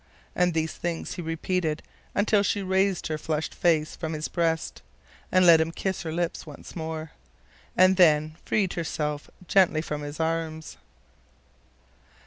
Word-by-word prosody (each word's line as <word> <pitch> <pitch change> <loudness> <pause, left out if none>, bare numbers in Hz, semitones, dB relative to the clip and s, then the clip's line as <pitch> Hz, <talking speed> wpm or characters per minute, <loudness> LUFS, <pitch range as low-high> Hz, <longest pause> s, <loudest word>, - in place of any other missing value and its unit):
And 180 -2 +2
these 160 0 0
things 170 -1 -4
he - - -5
repeated 165 -1 -2 0.3
until 205 0 +3
she 200 0 0
raised 190 0 +1
her 155 -1 -2
flushed 155 0 -2
face 160 -3 +1
from 160 -1 -4
his 155 0 -3
breast, 165 -2 -1 0.5
and 185 -1 +5
let 165 -2 +8
him 160 +1 -1
kiss 190 +2 -3
her 160 - -4
lips 170 +1 -2
once 150 -3 -11
more, 160 -1 -5 0.7
and 185 +1 +6
then 155 -3 +4
freed 195 -4 +1
herself 150 -3 -3 0.2
gently 180 -5 +4
from 150 -2 -4
his 145 +1 -7
arms. 160 -1 -2
165 Hz, 145 wpm, -26 LUFS, 155-180 Hz, 0.7 s, let